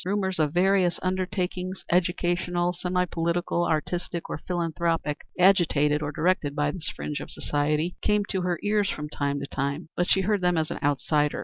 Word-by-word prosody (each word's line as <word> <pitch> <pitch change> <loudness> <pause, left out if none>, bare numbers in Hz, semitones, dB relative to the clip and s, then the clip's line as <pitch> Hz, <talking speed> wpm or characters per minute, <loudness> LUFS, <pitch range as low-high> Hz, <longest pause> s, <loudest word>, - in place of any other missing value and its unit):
Rumors 190 -1 -1
of 150 -2 +2
various 185 -1 +3
undertakings, 185 0 -2
educational, 175 0 +1
semi 180 0 0
political, 170 0 0
artistic, 170 +2 -2
or - - -3
philanthropic, 165 -3 -1 0.2
agitated 160 -6 +4
or 145 -1 -2
directed 155 -2 +1
by 145 -1 +1
this 160 -1 -5
fringe 150 -1 -4
of - - -7
society, 150 +4 -1
came 210 -1 +2
to 190 - -1
her 180 -1 0
ears 205 -1 +2
from 150 0 -4
time 140 -1 -1
to - - -3
time, 140 +4 -3
but 175 - +1
she 190 - +4
heard 205 +1 +1
them 180 -1 +2
as 155 -1 0
an - - -4
outsider. 145 +1 +1
175 Hz, 175 wpm, -26 LUFS, 150-185 Hz, 0.2 s, agitated